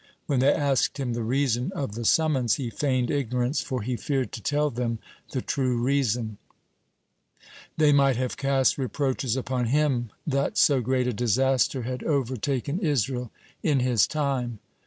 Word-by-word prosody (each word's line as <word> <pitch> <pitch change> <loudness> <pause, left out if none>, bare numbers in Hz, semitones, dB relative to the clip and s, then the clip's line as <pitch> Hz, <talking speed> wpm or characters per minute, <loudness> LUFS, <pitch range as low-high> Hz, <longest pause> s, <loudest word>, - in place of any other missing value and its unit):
When 140 -4 0
they 135 +3 +5
asked 140 -3 +1
him 125 -3 -1
the 120 - -2
reason 125 +3 0
of 140 - -3
the 115 +1 -5
summons, 135 -6 +3
he 125 -4 -4
feigned 130 +1 0
ignorance, 125 0 0
for 130 -5 -3
he 125 +3 -2
feared 130 +4 -2
to 115 - -7
tell 145 +4 +1
them 115 -1 -2 0.3
the 130 - -3
true 130 -3 0
reason; 120 -4 0 1.4
they 155 -2 +5
might 140 -2 +4
have 125 +1 -2
cast 135 0 +1
reproaches 130 -2 -1
upon 130 -1 -1
him 130 -2 +1 0.2
that 140 +7 0
so 140 -9 +4
great 130 +1 0
a 125 - 0
disaster 125 +2 +1
had 125 +2 -4
overtaken 135 - -1
Israel 130 - 0 0.3
in 145 -4 +2
his 125 -4 +3
time. 135 -6 -2
130 Hz, 155 wpm, -26 LUFS, 120-140 Hz, 1.4 s, they